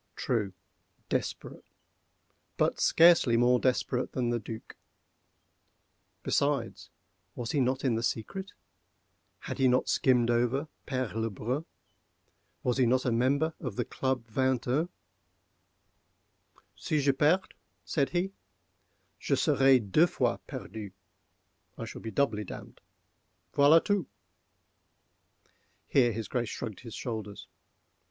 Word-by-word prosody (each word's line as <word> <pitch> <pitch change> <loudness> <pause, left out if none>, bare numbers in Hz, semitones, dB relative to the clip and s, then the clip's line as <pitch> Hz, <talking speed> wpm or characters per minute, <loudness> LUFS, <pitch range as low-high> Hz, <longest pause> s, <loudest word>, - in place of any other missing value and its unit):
True—desperate: 100 -6 -4 0.9
but - - +1
scarcely 165 -8 +5
more 125 +1 +4
desperate 125 0 0
than 120 -2 0
the 120 - 0
Duc. 110 +1 -9 1.5
Besides, 140 -5 -1 0.5
was 120 -2 -4
he 145 - +1
not 130 +1 0
in 125 - +2
the 115 - -1
secret?—had 190 - -7
he 135 - +4
not 125 0 +2
skimmed 120 -3 +3
over 125 +5 +1 0.2
Père 130 -4 -2
Le 115 +1 -1
Brun?—was 125 - -7
he 125 - +4
not 130 +2 +2
a 125 - +2
member 140 +7 +1
of 125 -8 -5
the - - -1
Club 130 -3 -2
Vingt 130 +2 0
un? 150 +8 +1 1.9
"Si 155 - -1
je 140 0 +3
perds," 155 +7 +2 0.4
said 140 -3 0
he, 180 +2 -1 0.9
"je - - +1
serai 135 -1 +4
deux 125 - +3
fois - - 0
perdu—I 95 -1 -11
shall 115 - -9
be 115 - -5
doubly 110 -2 0
damned—voilà 145 - -1
tout! 200 -8 0 1.8
(Here 125 -4 +3
his 110 0 -4
Grace 120 -3 -2
shrugged 110 -6 -6
his 115 -3 -9
shoulders.) 110 -4 -5
125 Hz, 110 wpm, -29 LUFS, 115-140 Hz, 1.9 s, scarcely